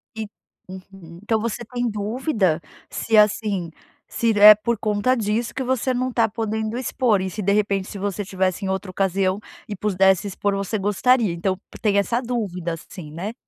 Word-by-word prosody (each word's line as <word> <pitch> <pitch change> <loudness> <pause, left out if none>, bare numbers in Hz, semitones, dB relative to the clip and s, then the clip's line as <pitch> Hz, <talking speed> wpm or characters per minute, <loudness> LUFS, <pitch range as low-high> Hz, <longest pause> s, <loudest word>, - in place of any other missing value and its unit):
E 220 -1 -4 0.4
uhum. 185 -2 -12
Então 220 0 +1
você 235 +2 -3
tá 245 +2 -11
em 245 -1 +1
dúvida 210 - 0 0.3
se, 225 -1 0
assim, 205 -5 +2 0.4
se 225 -2 0
é 210 0 +11
por 235 +1 -1
conta 215 +5 +1
disso 220 0 -1
que 265 - -3
você 260 0 0
não 255 +1 -1
está 230 -2 +2
podendo 220 +1 -3
expor, 245 -5 +1
e 190 - -2
se, 210 +4 -5
de 200 +1 +1
repente, 200 -2 0
se - - -8
você 200 +1 -3
tivesse 190 +1 -1
em - - -2
outra 190 0 -3
ocasião 195 0 0 0.3
e 210 - -5
pudesse 190 0 +2
expor, 200 +1 -1
você 200 +2 -2
gostaria. 210 +1 +2
Então 185 +2 -2 0.2
tem 205 -2 +2
essa 230 +5 +1
dúvida 195 -9 -3
assim, 165 -1 -10
né. 190 +8 -5
205 Hz, 185 wpm, -22 LUFS, 190-225 Hz, 0.4 s, é